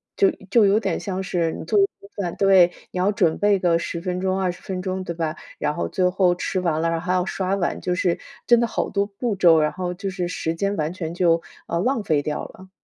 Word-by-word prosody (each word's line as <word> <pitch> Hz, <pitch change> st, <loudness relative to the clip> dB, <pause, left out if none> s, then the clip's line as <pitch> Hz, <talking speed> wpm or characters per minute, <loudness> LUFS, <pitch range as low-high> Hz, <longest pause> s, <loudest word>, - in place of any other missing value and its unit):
就 395 Hz, -2 st, +4 dB, 0.2 s
就 225 Hz, 0 st, +6 dB
有 200 Hz, +2 st, +4 dB
点 -, -, -1 dB
像 190 Hz, -2 st, -3 dB
是 170 Hz, -3 st, 0 dB
你 -, -, -7 dB
做 210 Hz, -, +1 dB
一 195 Hz, -, +6 dB
顿 200 Hz, -, -14 dB
饭 180 Hz, -4 st, -3 dB
对， 190 Hz, -3 st, +5 dB, 0.2 s
你 -, -, -6 dB
要 190 Hz, +3 st, +3 dB
准 165 Hz, -6 st, +1 dB
备 205 Hz, -1 st, +3 dB
个 175 Hz, -2 st, +3 dB
10 170 Hz, 0 st, -4 dB
分 180 Hz, 0 st, -2 dB
钟 190 Hz, 0 st, 0 dB
20 180 Hz, -2 st, -2 dB
分 185 Hz, -1 st, -4 dB
钟 185 Hz, 0 st, -3 dB
对 170 Hz, -, -4 dB
吧？ 160 Hz, -2 st, -2 dB, 0.2 s
然 150 Hz, -, -1 dB
后 -, -, -2 dB
最 185 Hz, -2 st, +1 dB
后 180 Hz, -1 st, +3 dB
吃 185 Hz, +1 st, -2 dB
完 165 Hz, -3 st, 0 dB
了， 165 Hz, -, +1 dB
然 165 Hz, 0 st, -1 dB
后 165 Hz, -, -10 dB
还 180 Hz, -, +1 dB
要 180 Hz, -1 st, +1 dB
刷 190 Hz, 0 st, -2 dB
碗， 180 Hz, -4 st, -1 dB
就 180 Hz, -, -1 dB
是 180 Hz, -1 st, +1 dB, 0.3 s
真 240 Hz, -1 st, +6 dB
的 235 Hz, -, +2 dB
好 -, -, -2 dB
多 200 Hz, 0 st, 0 dB
步 205 Hz, +2 st, -3 dB
骤， 170 Hz, -4 st, +5 dB
然 150 Hz, 0 st, +1 dB
后 180 Hz, -1 st, -3 dB
就 195 Hz, +2 st, -4 dB
是 180 Hz, -2 st, -3 dB
时 165 Hz, -2 st, -3 dB
间 200 Hz, +4 st, -1 dB
完 155 Hz, -2 st, -1 dB
全 170 Hz, -3 st, -5 dB
就， 170 Hz, -2 st, +2 dB, 0.3 s
呃， 170 Hz, -, -1 dB
浪 250 Hz, +1 st, 0 dB
费 155 Hz, -7 st, +1 dB
掉 150 Hz, 0 st, -3 dB
了。 190 Hz, 0 st, -13 dB
185 Hz, 270 characters per minute, -23 LUFS, 170-195 Hz, 0.3 s, 就